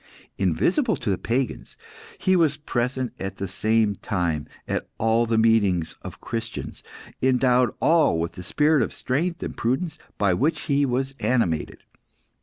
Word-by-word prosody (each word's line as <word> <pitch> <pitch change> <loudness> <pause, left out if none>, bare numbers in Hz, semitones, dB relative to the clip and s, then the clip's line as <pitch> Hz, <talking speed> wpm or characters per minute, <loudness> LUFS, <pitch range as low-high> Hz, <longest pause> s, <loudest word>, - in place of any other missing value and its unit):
Invisible 255 - +2
to 120 -6 -2
the 95 - 0
pagans, 125 +2 -2 0.4
he 185 - +2
was 160 -5 +3
present 125 -3 -2
at 95 0 -4
the 100 - -4
same 110 +2 +1
time 80 -4 -2 0.2
at - - -2
all 115 +1 +2
the 115 0 +1
meetings 100 -7 +2
of - - -9
Christians, 115 -1 -5 0.4
endowing 125 -1 +3
all 160 - +4
with 85 +1 -2
the - - -9
spirit 150 - +2
of - - -1
strength 165 +7 -2
and - - -5
prudence 135 +8 -1 0.2
by 100 -3 +2
which 150 - +1
he 140 -2 +1
was 135 +2 -1
animated. 105 -8 0
120 Hz, 150 wpm, -24 LUFS, 105-140 Hz, 0.4 s, all